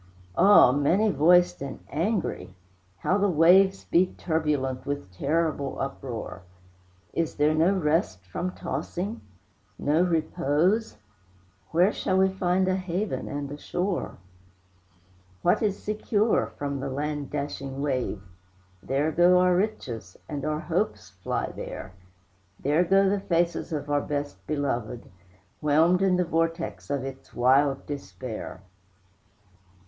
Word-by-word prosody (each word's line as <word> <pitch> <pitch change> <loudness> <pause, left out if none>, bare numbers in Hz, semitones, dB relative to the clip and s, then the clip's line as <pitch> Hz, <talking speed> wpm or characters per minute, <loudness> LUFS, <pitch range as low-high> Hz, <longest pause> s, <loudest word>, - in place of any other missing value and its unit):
Ah, 200 -10 +7
many 170 +10 +2
voiced 175 +2 +4
and 140 -1 -6
angry! 180 - -2 0.4
how 190 - +1
the 200 0 +2
waves 190 +4 +5
Beat 180 +2 +2
turbulent 150 -6 -1
with 145 -8 -4
terrible 145 - -1
uproar! 130 -7 -5 0.7
Is 165 -1 -1
there 150 +1 +3
no 165 +5 +3
rest 150 - 0
from 175 - -3
tossing, 180 - -4 0.6
no 150 +4 +2
repose? 175 - +1 0.7
Where 180 +5 +3
shall 185 - 0
we 190 0 +4
find 185 0 +1
a 185 0 +1
haven 185 +3 -3
and 145 -1 -4
a 145 - -7
shore? 180 +3 -3 1.3
What 175 - +3
is 205 -3 0
secure 215 +1 0
from 140 -1 -3
the 135 +1 -3
land 145 +1 -3
dashing 140 -2 -4
wave? 130 -8 -2 0.6
There 140 +4 0
go 175 +3 +5
our 180 0 +4
riches, 125 - -3
and 145 -3 -5
our 155 0 -1
hopes - - -2
fly - - -3
there; 90 - -7 0.7
There 150 +5 +2
go 195 +2 +4
the 200 +1 +1
faces 175 -2 0
of 145 -2 -3
our 145 0 +1
best 145 0 -5
beloved, 125 -6 -3 0.5
Whelmed 160 +5 +3
in 190 -1 +3
the 180 0 +1
vortex 165 - -2
of 140 -2 -1
its 135 0 -9
wild 135 +3 +3
despair. 130 -8 -7
155 Hz, 125 wpm, -26 LUFS, 140-180 Hz, 1.3 s, Ah